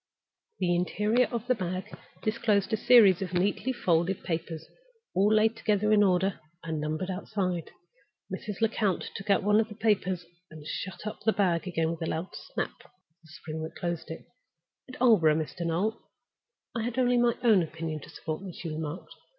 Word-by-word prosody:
The 175 -1 +1
interior 210 +7 +2
of 235 -2 -4
the 255 - +3
bag 185 -4 -4 0.3
disclosed 215 -2 +1
a - - +6
series 210 -5 +6
of 180 -2 -3
neatly 200 +7 +1
folded 180 -5 +1
papers, 165 -2 -3 0.5
all 200 +3 +3
laid 220 +1 +4
together 210 0 +1
in 210 - +6
order, 190 -1 +2 0.2
and 160 -2 -3
numbered 155 +5 -2
outside. 185 -3 -2 0.6
Mrs. 210 0 -5
Lecount 215 -4 0
took 195 +1 -7
out 200 - +4
one 210 +1 +4
of 220 0 +1
the 210 - -9
papers, 190 -5 +1 0.2
and 155 -2 -11
shut 190 +6 -5
up 215 - -5
the 220 - +3
bag 180 -4 +1
again 165 -2 0
with 165 - -6
a 165 - -1
loud 165 +4 -4
snap - - -5
of - - -22 0.3
the 165 - -20
spring 155 0 -7
that 160 - -6
closed 170 -2 -3
it. 160 - -7 0.6
"At 255 - -10
Aldborough, 205 -11 +5
Mr. 160 +2 -4
Noel, 200 +7 -1 0.7
I 230 - 0
had 235 +2 -3
only 245 -1 +3
my 240 -1 +3
own 220 -6 +6
opinion 160 -1 -4
to - - -12
support 155 +2 -5
me," 190 -3 -7
she 165 - -6
remarked. 155 +2 -5
190 Hz, 185 wpm, -28 LUFS, 165-215 Hz, 0.7 s, a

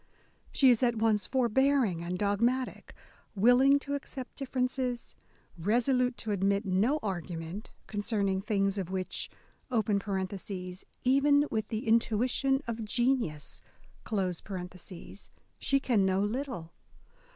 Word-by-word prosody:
She 265 -2 +6
is 235 - +2
at 240 -2 +3
once 220 -2 +1
forbear 265 +2 +3
ing 170 -4 -3
and 180 +1 -3
dogmatic; 235 +6 0 0.4
willing 245 +7 +6
to 285 0 -4
accept 270 -2 -6
differences, 255 -2 -2 0.4
resolute 245 +6 +2
to 220 - -3
admit 200 +1 +1
no 200 +10 +2
argument... 175 0 -4 0.2
concerning 205 -2 -1
things 195 -1 0
of 185 -2 -4
which 185 -1 -2 0.4
(even 205 +6 0
with 220 -1 -1
the 225 0 -4
intuition 245 +5 +2
of 230 -2 -4
genius) 230 - -1 2.0
she 275 - +2
can 240 -7 +2
know 190 +1 +2
little 220 - -3
220 Hz, 105 wpm, -30 LUFS, 195-255 Hz, 2.0 s, She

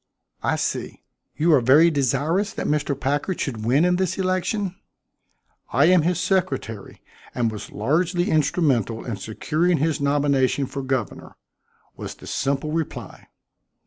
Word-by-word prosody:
"I - - +1
see. - - -3 0.3
You 165 +2 +3
are 140 - +5
very 150 +8 +6
desirous 155 - 0
that - - -4
Mr. 145 -2 0
Packard 145 +7 -1
should 115 -6 -3
win 135 +8 +3
in 180 0 +2
this 185 -2 -1
election?" 185 +1 -1 1.0
"I - - +4
am 180 - +5
his 175 +2 0
secretary, 180 - -2 0.3
and 115 -2 +1
was 105 - -8
largely 175 - 0
instrumental 135 - +1
in 115 -5 -4
securing 155 - 0
his 155 0 0
nomination 140 -1 +2
for 140 +1 -5
governor," 130 -4 -3 0.6
was - - -7
the - - -14
simple 140 +2 -1
reply. 160 -1 -5
145 Hz, 140 wpm, -23 LUFS, 130-175 Hz, 1.0 s, very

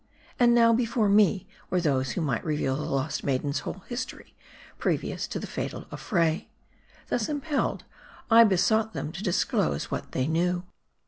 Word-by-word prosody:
And 240 -1 +5
now, 230 -1 +6
before 230 -2 +1
me 200 -2 +4 0.2
were 185 - +1
those 135 -6 0
who - - -2
might 135 -8 -1
reveal 150 -4 0
the 150 - -3
lost 140 +3 -1
maiden's 140 +1 0
whole 185 +6 -7
history, 240 0 -6 0.5
previous - - -1
to - - -4
the - - -5
fatal - - -5
affray. 165 -5 0 0.6
Thus 225 -3 0
impelled, 290 0 -1 0.4
I 230 0 +8
besought 220 +3 +2
them 150 - -4
to 175 - -7
disclose 125 - 0
what - - -4
they 130 - 0
knew. 175 +3 0
180 Hz, 155 wpm, -27 LUFS, 150-225 Hz, 0.6 s, I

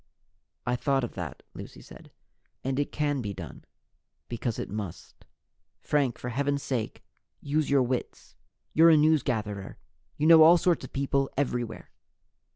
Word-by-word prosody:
"I 125 - 0
thought 135 +1 0
of 120 - -4
that," 90 -5 -7
Lucy - - -10
said, - - -14 0.5
"and 135 +1 -1
it 145 - -1
can 145 -2 -1
be 100 -3 -5
done, - - -9 0.6
because 120 -1 -3
it - - -4
must. 100 -4 -8 0.5
Frank, 140 -5 0
for 125 - -5
heaven's 140 +3 -1
sake, 120 -5 -3 0.4
use 150 +1 -1
your 140 -2 +4
wits! 125 0 -4 0.4
You're 165 +2 +7
a 160 - +6
newsgatherer. 120 -10 0 0.4
You 150 - 0
know 165 0 +8
all 165 +3 +8
sorts 175 -1 +1
of - - -9
people 140 0 0
everywhere." 120 -5 -3
135 Hz, 150 wpm, -27 LUFS, 120-150 Hz, 0.6 s, know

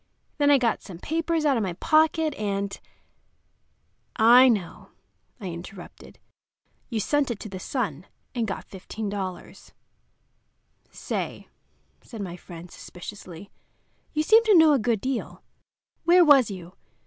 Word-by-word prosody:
Then 290 0 +4
I 285 - +6
got 240 -4 0
some 185 -4 -10
papers 325 - -1
out 280 -4 +3
of - - 0
my 190 -4 -2
pocket, 310 - +2
and—" 200 -3 -3 1.4
"I 245 +3 +7
know," 200 -7 -2 0.5
I 195 -5 -6
interrupted. 175 +2 -11 0.7
"You 230 -4 -2
sent 290 +5 0
it 230 -4 -4
to 215 - -7
the 190 -1 -7
Sun 185 - -4 0.3
and 235 -3 -1
got 195 - -5
$15." 195 -2 -7 1.2
"Say," - - -5 0.5
said 230 - -11
my 180 -3 -5
friend, 175 -1 -12
suspiciously, 185 0 -10 0.6
"you 305 -1 0
seem 445 +7 +6
to 420 -4 +6
know 320 -2 +6
a 275 - +3
good 225 -2 0
deal. 260 -1 -4 0.6
Where 350 +1 +6
was 275 -7 +6
you? 180 -3 -9
220 Hz, 135 wpm, -25 LUFS, 190-290 Hz, 1.4 s, I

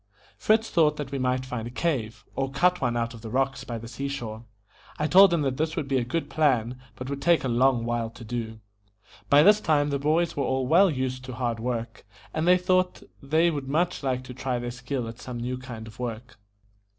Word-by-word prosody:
Fritz 220 +1 +2
thought 150 -3 +3
that 145 -3 -5
we 140 - -2
might 130 0 0
find 125 -3 -4
a - - -5
cave, 120 -5 -2
or 135 0 -1
cut 180 +7 +2
one 120 -2 0
out 115 0 -2
of 115 - -11
the 110 - -7
rocks 135 +2 0
by 120 - -5
the 115 +1 -8
sea 130 +4 -4
shore. 120 -5 -6 0.5
I 150 - 0
told 190 +5 +7
him 165 -3 +1
that 130 -2 -1
this 155 +1 -1
would 140 - -2
be 135 -1 +1
a - - -1
good 160 +8 -2
plan, 130 -5 +1
but 130 - -7
would 140 0 -4
take 170 +1 +3
a - - -1
long 120 0 +2
while 120 -1 -1
to 115 +1 -12
do. 110 -1 -5 0.7
By 145 +1 +7
this 210 +3 +6
time 145 -4 +2
the 140 - 0
boys 160 +4 +1
were 145 - -1
all 130 0 0
well 180 +8 +5
used 130 -3 -3
to 130 - -7
hard 120 -2 -2
work, 115 -2 -4 0.3
and 160 +2 -1
they 180 0 +7
thought 185 0 +1 0.2
they 160 +5 +2
would 140 -4 -4
much 170 +6 0
like 130 -2 -1
to 130 - -9
try 130 0 -2
their 120 0 -4
skill 125 0 -4
at 115 +1 -9
some 125 -2 -6
new 125 +2 -3
kind 120 -4 -8
of 110 +1 -13
work. 120 -1 -6
130 Hz, 235 wpm, -26 LUFS, 120-150 Hz, 0.7 s, told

